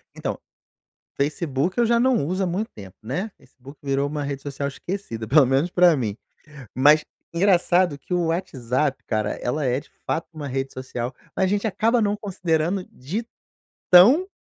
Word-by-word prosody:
Então, - - -3 0.8
facebook 150 - -1
eu 240 - +4
já 235 +1 +3
não 250 - +2
uso 185 +5 -1
há - - +1
muito 195 +6 -2
tempo, 95 -3 -11
né, 165 - -3
Facebook 135 +3 -16
virou 140 0 0
uma 150 0 -3
rede 140 -1 -4
social 140 0 -4
esquecida 140 - -5
pelo 140 +3 +6
menos 135 +7 +1
pra 175 -2 +5
mim, 110 -6 -3 0.6
mas 150 +4 +5 0.3
engraçado 175 -2 +3
que 140 - -11
o 175 -1 +1
WhatsApp 140 -5 -1
cara, 110 -2 -1
ela 145 +5 -2
é 125 0 +1
de 150 - -11 0.2
fato 165 - -1
uma 150 -3 -6
rede 135 +1 -3
social, 130 -1 -5 0.2
mas 190 - +2
a - - +2
gente 205 +3 0
acaba 225 +4 +2
não 205 -1 +1
considerando 180 -2 -1
de 180 - -5 0.7
tão 245 - +7
155 Hz, 170 wpm, -23 LUFS, 135-185 Hz, 0.8 s, tão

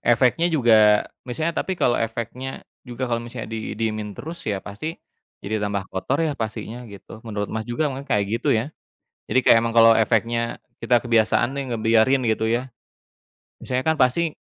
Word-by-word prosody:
Efeknya 125 +8 +3
juga 110 -9 +5 0.2
misalnya 160 +7 -1
tapi 190 - -3
kalau 120 -7 +2
efeknya 115 +3 -4 0.2
juga 120 +1 -4
kalau 120 -2 -1
misalnya 115 -2 -8
didiemin 110 -2 -3
terus 165 +3 -7
ya 100 -2 -3
pasti 135 +12 -6 0.5
jadi 110 +2 -2
tambah 100 -1 -2
kotor 110 +9 -1
ya 155 - 0
pastinya 115 0 -6
gitu. 100 +2 -12
Menurut 105 -2 -4
Mas 110 0 -4
juga 135 +6 0
makanya 135 +2 -8
kayak 100 - +1 0.2
gitu - - -2
ya. 125 +8 -3 0.6
Jadi 130 - +3
kayak - - +7
emang 115 - -1
kalo 115 -1 +7
efeknya 115 +1 0 0.2
kita 120 -1 +4
kebiasaan 115 0 +2
nih 140 - -2
ngebiarin 115 +4 +3
gitu 110 0 +1
ya, 120 +3 -1 0.9
misalnya 130 0 -2
kan 160 - +1
pasti 155 +6 +2
115 Hz, 165 wpm, -23 LUFS, 110-130 Hz, 0.9 s, kayak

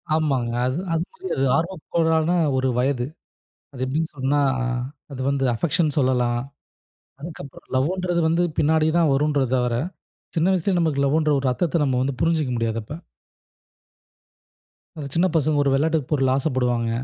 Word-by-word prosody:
ஆமாங்க. 135 -7 0
அது, 130 +5 -1 0.2
அது, 165 +1 +1 0.3
அது 135 0 +1
ஆர்வக்கோலான 160 -1 0 0.3
ஒரு 130 0 +1
வயது. 125 -1 +1 0.7
அது 130 - -10
எப்டின்னு 155 +5 -1
சொன்னா, 140 +2 +1 0.7
அது 130 - -7
வந்து 140 -1 0
அஃபெக்ஷன் 155 +3 0
சொல்லலாம். 125 -2 +1 0.8
அதுக்கப்புறம் 150 -4 -10
லவ்ன்றது 175 +5 0
வந்து 170 +2 +2 0.2
பின்னாடி 155 +1 +3
தான் 160 -4 +3
வரும்ன்ற 145 0 +1
தவர, 125 -1 0 0.6
சின்ன 165 +3 +3
வயசுலயே 185 0 +1
நமக்கு 150 -4 +1
லவ்வுன்ற 155 +2 +2
ஒரு 130 - 0
அர்த்தத்த 165 +3 0
நம்ம 130 -2 +1
வந்து 130 -1 -2
புரிஞ்சுக்கிற 155 -6 +1
முடியாது 115 -1 -1
அப்ப. 110 - -8 2.0
அந்த 150 -3 -6
சின்ன 170 +3 +3
பசங்க 155 -1 +2
ஒரு 140 - +2
வெளாட்டு 160 +3 +2
பொருளுக்கு 135 -3 +2
ஆசப்படுவாங்க. 125 -4 0
145 Hz, 135 wpm, -23 LUFS, 130-160 Hz, 2.0 s, பின்னாடி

